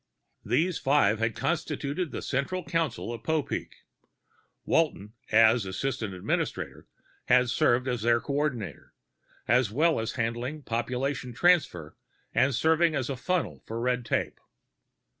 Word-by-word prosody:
These 175 +2 +1
five 130 -7 +3
had 115 0 0
constituted 165 0 -2
the - - -6
central 175 +8 -2
council 155 -8 -2
of 115 - -7
Popeek. 160 +2 -3 0.8
Walton, 110 -10 0 0.2
as 115 +1 +5
assistant 110 +1 -3
administrator, 90 - -3 0.4
had 125 -1 +4
served 125 +2 +2
as 125 -3 -1
their 115 +1 +3
coordinator, 130 - -3 0.5
as 120 -1 +3
well 155 +8 +2
as 110 - -3
handling 120 +5 -3
population 125 +2 -2
transfer 125 - +2 0.4
and 130 +1 +3
serving 160 +4 +3
as 130 -1 -1
a - - -2
funnel 180 +7 -2
for 115 +1 -4
red 125 +1 0
tape. - - -2
125 Hz, 125 wpm, -28 LUFS, 115-150 Hz, 0.8 s, as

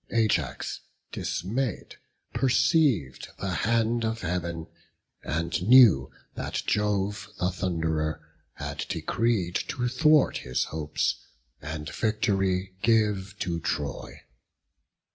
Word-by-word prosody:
Ajax, 105 - 0 0.3
dismayed, 115 +4 -3 0.4
perceived 130 - +2
the 95 - -3
hand 115 +5 +1
of 110 0 -2
Heaven, 85 -2 -3 0.6
And 85 +4 -2
knew 105 - +7 0.2
that - - -3
Jove 105 -1 0
the 90 +1 0
Thunderer 80 -4 -1 0.3
had 70 0 -5
decreed 110 -7 0
To 125 -1 -2
thwart 150 +4 +4
his 65 0 -1
hopes, 75 -1 -2 0.4
and 75 +1 -5
victory 95 -3 0
give 105 -4 +2
to 85 -2 -1
Troy. 75 -3 -4
95 Hz, 95 wpm, -27 LUFS, 80-115 Hz, 0.6 s, knew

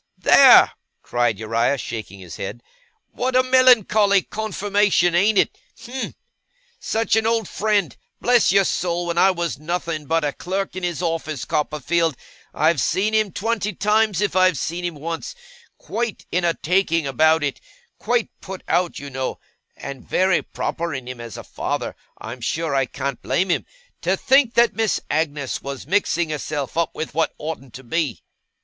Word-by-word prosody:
'There!' - - +7 0.3
cried 120 -3 0
Uriah, 115 +5 0
shaking 110 -5 -6
his 90 -3 -10
head. 120 +5 -6 0.5
'What 255 +1 -2
a 255 - +5
melancholy 225 -6 +5
confirmation: 205 -4 +1
ain't 200 +4 +3
it? - - +2 0.2
Him! 260 +1 -6 0.6
Such 225 -1 0
an 220 0 +2
old 225 -3 +1
friend! 205 -5 0 0.2
Bless 245 -5 +4
your 195 +1 +5
soul, 175 -1 -1
when 170 0 -1
I 190 - +6
was 170 -5 -2
nothing 165 -2 -3
but 165 +1 +1
a 145 -1 -1
clerk 190 0 -3
in 185 - -4
his 175 0 -2
office, 160 -6 -2
Copperfield, 155 0 0 0.3
I've 155 -3 +2
seen 205 +9 +1
him 215 -2 +2
twenty 215 0 -2
times, 210 -1 +2
if 205 -3 0
I've 185 -4 +4
seen 170 +7 -3
him 175 -2 -3
once, 165 - -5 0.4
quite 235 -2 -4
in 180 +1 0
a 170 -1 +2
taking 165 -2 +1
about 155 +4 +3
it 140 - -2 0.4
quite 240 -2 0
put 190 -1 -8
out, 175 -1 +1
you 140 0 -8
know 130 0 -3 0.4
(and 140 -1 -7
very 185 -1 +3
proper 170 -3 -4
in 130 -2 -6
him 125 -2 -7
as 115 -4 -8
a - - -8
father; - - -4 0.2
I'm 120 +3 -8
sure 160 +5 -2
I 135 -1 +1
can't 135 +1 -4
blame 190 +1 0
him), - - -1 0.3
to - - +1
think 265 -2 +3
that 235 0 +4
Miss 220 -2 0
Agnes 145 -3 -1
was 140 -1 -6
mixing 175 -2 +1
herself 145 -2 -4
up 170 0 0
with 160 - -5
what 165 +1 0
oughtn't 150 -5 -7
to 130 - -9
be. 145 0 -2
170 Hz, 170 wpm, -22 LUFS, 145-205 Hz, 0.6 s, There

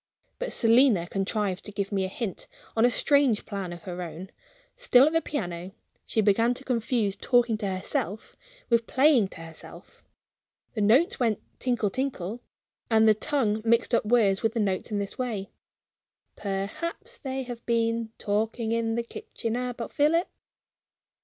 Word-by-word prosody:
But - - -3
Selina 230 -5 +4
contrived 195 0 -2
to 210 - -5
give 200 0 -3
me 195 -2 0
a - - -1
hint, 195 +1 -5 0.3
on 225 +1 +4
a - - +5
strange 275 -3 +2
plan 195 -4 -4
of 170 -1 -9
her 180 -1 -5
own. 175 +2 -7 0.4
Still 280 - +5
at 310 - +1
the 325 - +3
piano, 180 - -4 0.3
she 220 - +1
began 225 +4 +3
to 265 - -8
confuse 230 -5 0
talking 240 +1 +2
to 205 - -2
herself 190 +1 -3 0.3
with 235 -1 +2
playing 265 -6 +4
to 165 - -11
herself. 165 -1 -12 0.7
The 215 - -2
notes 245 - +4
went 225 -5 +1 0.2
tinkle, 240 -5 0
tinkle 240 -4 -3 0.5
and 220 -1 +5
the 215 - +7
tongue 215 -2 0
mixed 230 +1 +2
up 235 - +3
words 210 -4 +3
with 225 +1 0
the - - +1
notes 195 -3 -1
in 210 - 0
this 200 +3 -4
way: 220 -6 -3 0.8
"Perhaps 275 - -4
they 265 -1 -3
have 240 -2 -8
been 230 -1 0
talking 220 +2 -1
in 230 0 0
the 235 - -1
kitchen 230 0 -5
about 245 -2 -4
Philip?" 320 +4 +3
225 Hz, 160 wpm, -27 LUFS, 200-245 Hz, 0.8 s, the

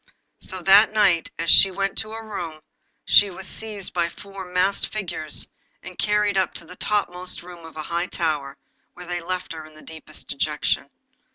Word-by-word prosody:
So 185 -2 -1
that 200 +3 +7
night, 185 -6 +3
as 165 - -2
she 195 - +8
went 195 +1 -2
to 220 - -1
her 225 +1 -6
room, 170 -7 -5 0.4
she 205 - +7
was 190 0 -7
seized 210 -2 -4
by 170 -1 +1
four 195 +1 -9
masked 180 +2 +1
figures, 170 -7 -1 0.4
and 180 +1 -9
carried 210 -1 +2
up 190 - 0
into 170 - -6
the 180 - -11
topmost 180 -4 -1
room 175 -1 -11
of 165 -1 -11
a 155 - -3
high 170 +3 -1
tower, 150 -6 -1 0.4
where 180 - -9
they 175 0 -3
left 180 0 -4
her 160 -1 -7
in 155 0 -14
the 155 - -14
deepest 160 -1 -10
dejection. 140 -1 -1
180 Hz, 185 wpm, -24 LUFS, 165-195 Hz, 0.4 s, she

